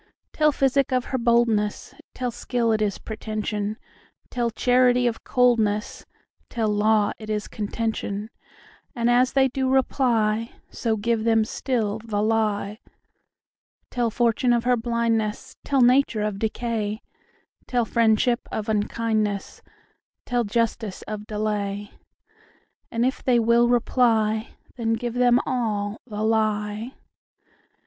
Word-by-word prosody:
Tell 305 -1 +3
physic 270 -1 +1
of 255 -1 +1
her 260 - +1
boldness; 230 -3 +1 0.2
Tell 250 -1 -2
skill 235 0 -1
it 215 -1 +1
is 205 -2 0
pretension; 215 -1 -4 0.5
Tell 240 -1 0
charity 250 +1 +3
of 235 -2 -1
coldness; 225 -4 +1 0.4
Tell 225 -3 -1
law 210 0 +2
it 215 -1 -9
is 210 -1 -2
contention:And 225 +3 -4
as 250 +1 +3
they 270 -1 +4
do 265 0 -1
reply, 230 -4 +1 0.2
So 225 -2 -1
give 225 +1 0
them 225 -1 +3
still 220 -3 -2
the 215 -3 -2
lie. 215 -1 0 1.1
Tell 240 -2 0
fortune 240 +2 +2
of 235 -1 +1
her 250 0 +3
blindness; 230 -2 -1
Tell 275 -2 +1
nature 245 -3 +3
of 210 -2 -2
decay; 220 -1 -2 0.6
Tell 245 -2 +1
friendship 230 +1 +2
of 215 0 -3
unkindness; 215 -1 -1 0.6
Tell 245 -1 0
justice 220 -2 -2
of 210 0 -7
delay; 205 -1 -3 1.0
And 230 +1 0
if 260 - -1
they 250 -2 +3
will 235 +1 +4
reply, 225 -2 +1 0.2
Then 225 -2 0
give 235 +1 -3
them 245 0 +4
all 215 -4 -2
the 210 -2 -4
lie. 215 +1 0
225 Hz, 125 wpm, -24 LUFS, 215-245 Hz, 1.1 s, they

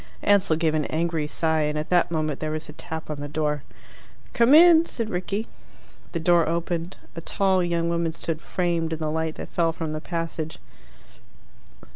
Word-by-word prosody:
Ansell 200 -5 +4
gave 160 -1 +1
an 155 -2 0
angry 160 -1 -1
sigh, 160 0 +1
and 150 0 0
at 150 +3 -4
that 175 -1 +4
moment 155 -3 -1
there 155 - -2
was 155 0 -4
a - - -10
tap 160 0 -6
on 150 - -5
the 145 - -5
door. 150 -1 -1 0.7
"Come 240 +4 +5
in!" 335 0 +8
said 230 -2 -4
Rickie. 195 +4 -2 0.7
The 170 - -1
door 170 0 +3
opened. 170 +1 -2 0.2
A 165 - -5
tall 190 +1 +1
young 170 -1 0
woman 170 -1 0
stood 160 0 -4
framed 170 -2 -1
in - - -2
the 155 -1 -2
light 160 0 -2
that - - -7
fell 165 -1 +1
from 160 -1 -4
the 155 - -4
passage. 165 -2 -4
165 Hz, 185 wpm, -25 LUFS, 155-175 Hz, 0.7 s, in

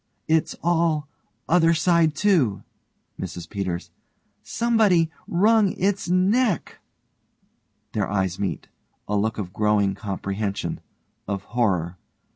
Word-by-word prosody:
It's 160 0 +1
all 165 -3 +1 0.4
other 165 0 +4
side 165 -2 +3
to. 135 - +2 0.6
MRS 85 -2 -6
PETERS: 95 -4 -4 0.5
Somebody 210 -9 +2 0.2
wrung 205 +2 +3
its 200 0 -1
neck. 195 +4 +1 1.1
(_Their 105 -3 -1
eyes 95 -2 -1
meet. 100 - -3 0.4
A 105 - -1
look 110 +2 0
of 95 -4 -5
growing 105 -1 +2
comprehension, 100 0 -3 0.5
of 100 -1 -3
horror. 90 -8 0
145 Hz, 100 wpm, -24 LUFS, -, 1.1 s, other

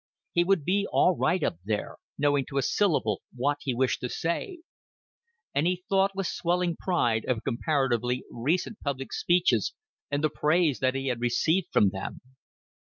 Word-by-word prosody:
He 175 - +4
would 175 -5 +1
be 200 +3 +1
all 180 - +4
right 180 - +1
up 85 - 0
there, 105 +1 -3 0.2
knowing 145 -2 +2
to 140 - -5
a 135 - +2
syllable 155 - +1
what 145 +4 0
he 130 -3 -2
wished 130 +1 +1
to 125 - -4
say; 325 - -3 0.9
and 145 +4 +2
he 180 0 -1
thought 195 0 +2
with 195 0 -2
swelling 175 0 0
pride 120 -13 0
of 120 -4 -1
comparatively 125 -2 0
recent 170 - -1
public 135 -3 -4
speeches 175 - +2 0.4
and 145 +1 -1
the 155 - +3
praise 155 -2 +2
that 130 0 +1
he 135 0 -1
had 120 -2 -2
received 155 +9 +1
from 100 - +4
them. 95 - -6
145 Hz, 165 wpm, -27 LUFS, 125-180 Hz, 0.9 s, He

